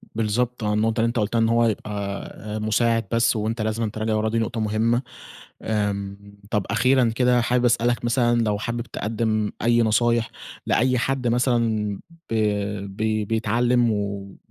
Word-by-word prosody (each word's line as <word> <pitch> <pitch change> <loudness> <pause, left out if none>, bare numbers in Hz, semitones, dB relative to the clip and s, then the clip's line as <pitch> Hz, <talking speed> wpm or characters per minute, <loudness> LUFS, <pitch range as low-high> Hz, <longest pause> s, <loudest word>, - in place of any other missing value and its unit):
بالضبط 115 +2 -1
آه، 105 0 0
النقطة 110 +2 +1
اللي 115 - +3
أنت 115 +1 -1
قلتها 110 +2 0
إن 115 0 +3
هو 115 0 +3
يبقى 110 -1 -2 0.5
آآ، 105 0 -5
مساعد 115 +1 +1
بس، 115 0 +2
وأنت 110 +1 -2
لازمًا 110 +1 -1
تراجع 110 +1 -2
وراه، 110 +1 0
دي 115 +1 0
نقطة 115 0 -2
مهمة. 110 +3 +1 0.6
آمم، 100 -2 -2 0.3
طب، 105 -4 0
أخيرًا 130 -2 +3
كده 125 0 +3
حابب 125 +1 +1
أسألك 120 0 +1
مثلًا 120 -1 +2
لو 105 -2 0
حابب 120 +2 -3
تقدم 110 -2 -2
أي 120 +1 +3
نصايح 115 +1 +2 0.4
لأي 125 +1 +2
حد 130 0 -1
مثلًا 115 -4 +1 0.3
ب 115 - 0 0.6
بـي 110 -1 0
بيتعلم 115 +2 +1
ول 100 -2 -4
115 Hz, 155 wpm, -23 LUFS, 110-120 Hz, 0.6 s, اللي